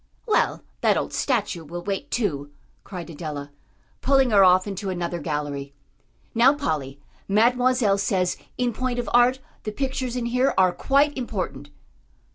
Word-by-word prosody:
"Well, 430 - +1 0.2
that - - +3
old - - -3
statue 170 -3 -1
will 175 +3 -7
wait, 195 0 -3
too," 145 - -1 0.3
cried 175 -3 -8
Adela, 145 -2 -6 0.5
pulling 270 -2 +3
her 200 -2 +6
off 185 0 +5
into 200 -1 -4
another 175 -1 -3
gallery. 145 -2 -4 0.6
"Now, 250 +5 +5
Polly, 145 - -3 0.3
Mademoiselle 240 0 +3
says, 185 -2 +1 0.2
in 245 -1 0
point 255 +2 -2
of 245 - -2
art, 245 +2 +5 0.2
the 215 - -4
pictures 260 +1 -3
in 245 -2 -2
here 250 +3 +1
are 185 -1 +5
quite 285 +2 +2
important." 175 - -4
200 Hz, 145 wpm, -24 LUFS, 170-250 Hz, 0.6 s, her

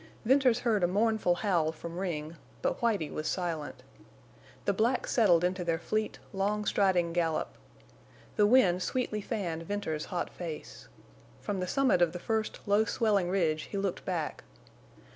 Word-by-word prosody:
Venters 255 -1 +4
heard 220 -6 +1
a - - +5
mournful 210 -1 +2
howl 175 -5 +1
from 170 +2 -7
Ring, 165 -4 -3 0.3
but - - 0
Whitie 210 -10 +1
was 155 - -3
silent. 165 -5 -3 0.8
The 200 - +2
blacks 230 +6 +1
settled 180 -8 +4
into 180 0 0
their 165 -1 0
fleet, 215 +5 -2 0.2
long 205 +2 0
striding 180 -5 +2
gallop. 165 -2 0 0.9
The 210 -2 +4
wind 195 -7 +4
sweetly 215 0 -1
fanned 185 -7 -3
Venters's 165 -4 -3
hot 175 -2 -3
face. 165 -4 -7 0.5
From 195 - -3
the 180 - -2
summit 260 -6 +2
of 170 -2 +3
the 175 - -5
first 220 +3 -2
low 205 +2 +4
swelling 210 -5 +1
ridge 165 -5 +1
he 200 - -4
looked 195 -2 -2
back. 170 -5 -3
185 Hz, 155 wpm, -30 LUFS, 170-215 Hz, 0.9 s, a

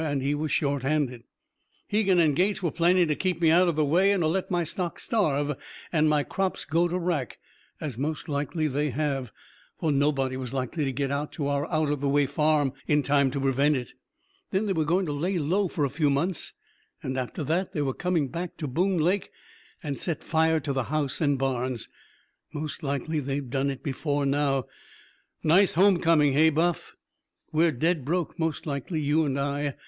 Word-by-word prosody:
And 145 -4 -1
he 140 +2 +1
was 150 +1 -2
short 140 -2 +1
handed. 130 -4 -1 0.6
"Hegan 200 -3 +2
and 155 -4 +4
Gates 190 +4 +1
were 170 - +1
planning 175 +1 +3
to 150 - +1
keep 185 +1 -1
me 165 -2 +4
out 180 +2 +5
of 170 - +1
the 155 -1 +2
way 180 +7 +4
and 195 -4 +1
to - - +2
let 185 +4 -1
my 175 -2 +1
stock 170 +2 -3
starve 150 - 0 0.4
and 155 -1 +3
my 150 -1 +2
crops 190 +4 -2
go 165 +3 +2
to 175 +1 -2
wrack 170 - -2 0.4
as 135 -6 -5
most 155 +3 -3
likely 150 +2 -1
they 145 +1 0
have, 135 -3 -2 0.5
for 160 - +1
nobody 135 -2 +1
was 130 0 -5
likely 135 +4 -2
to 135 - -1
get 140 +2 -2
to 145 -3 -2
our 140 0 -1
out 155 -2 +1
of 145 -2 -2
the 140 - +1
way 145 +1 +3
farm 145 -1 +1
in 150 -1 +3
time 140 -1 +3
to 140 - -3
prevent 135 +2 +2
it. 125 -2 -5 0.6
Then 195 +3 0
they 200 - 0
were 160 -3 0
going 180 +5 +1
to 150 - -3
lay 175 +6 -1
low 180 +6 +1
for 155 -4 -1
a - - -1
few 150 +1 +1
months, 160 +5 -1 0.5
and 130 - -3
after 130 +4 -3
that 170 +6 -1
they 150 - 0
were 135 -2 -1
coming 175 -3 0
back 170 +5 -5
to 150 - -4
Boone 180 +8 +1
Lake 180 +5 +1 0.5
and 145 -4 -4
set 170 -4 -3
fire 160 0 +2
to 140 0 -2
the 130 -2 -1
house 150 -1 -2
and 145 -3 +2
barns. 130 -2 -2 0.6
Most 150 0 -5
likely 140 +2 -2
they've 135 -2 -3
done 135 0 0
it 135 -1 -5
before 145 +1 -1
now. 135 -2 +1 0.8
Nice 180 +5 +4
home 190 +1 +5
coming, 150 -4 +4
hey, 155 +3 +5
Buff? 165 +3 -1 0.6
We're 160 +1 +3
dead 160 +3 0
broke, 170 +4 -2
most 160 -1 -1
likely, 150 +2 -3
you 155 +2 +2
and 140 -1 -1
I. 140 0 -1
150 Hz, 205 wpm, -27 LUFS, 140-170 Hz, 0.8 s, out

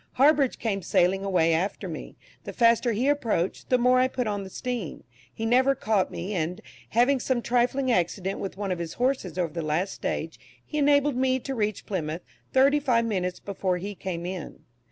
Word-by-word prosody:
Harbridge 280 0 +4
came 205 -4 -2
sailing 185 +2 +2
away 175 -4 +2
after 180 +5 -1
me; - - -7 0.3
the - - -7
faster 235 0 +4
he 235 +5 0
approached, 230 -11 0
the 255 - +4
more 250 +1 +4
I 255 - +4
put 255 -1 -2
on 205 -2 -2
the 190 - -8
steam. 240 - -4 0.3
He 225 - -5
never 260 +4 +4
caught 215 -5 +1
me, 190 +5 -5
and, 175 0 -2 0.3
having 250 +4 +3
some 245 -1 -1
trifling 250 +2 +1
accident 190 0 0
with 190 -1 -5
one 200 -2 -2
of 180 - -2
his 170 -1 -4
horses 250 -8 -1
over 170 -4 -1
the 170 - -3
last 160 +5 -1
stage, - - -4 0.3
he 300 - -3
enabled 285 -2 +3
me 260 0 +2
to 270 - -4
reach 215 -4 -2
Plymouth 165 -3 -3 0.3
thirty 275 +3 +4
five 240 -5 +2
minutes 180 -5 -2
before 190 -2 -2
he 200 +3 -5
came 180 -3 -5
in. 180 -3 -6
215 Hz, 195 wpm, -26 LUFS, 180-255 Hz, 0.3 s, Harbridge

